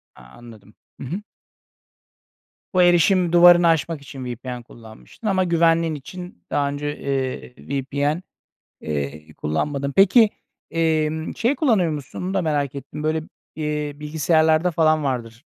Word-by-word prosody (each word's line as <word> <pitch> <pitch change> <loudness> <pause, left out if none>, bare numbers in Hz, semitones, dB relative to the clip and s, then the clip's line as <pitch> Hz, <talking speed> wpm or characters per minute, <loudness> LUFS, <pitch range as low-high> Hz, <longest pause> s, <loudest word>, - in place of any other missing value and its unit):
A, - - -16
anladım. 105 - -15 0.2
I - - -7
hı. 180 +10 -5 1.5
Bu 185 - +4
erişim 175 0 +4
duvarını 175 0 +7
aşmak 165 -1 +1
için 135 -2 -9
VPN 125 0 -6
kullanmıştın 115 - -11
ama 190 -2 +2
güvenliğin 165 -2 +2
için 180 +6 -10
daha 140 -1 0
önce, 145 +1 -4
eee, 130 -2 -3
VPN, 140 +4 -2 0.6
eee, 75 0 -5
kullanmadın. 140 - -2
Peki 205 +3 +6 0.4
emm, 160 -1 0
şey 240 +5 +1
kullanıyor 215 - +2
musun 145 -3 -6
onu 185 +1 -3
da 195 - +1
merak 145 -4 -1
ettim, 140 +2 -7
böyle, 155 +1 0 0.3
eee, 150 -1 -2
bilgisayarlarda 160 +3 +2
falan 155 -1 +2
vardır. 120 -1 -4
150 Hz, 130 wpm, -22 LUFS, 135-170 Hz, 1.5 s, duvarını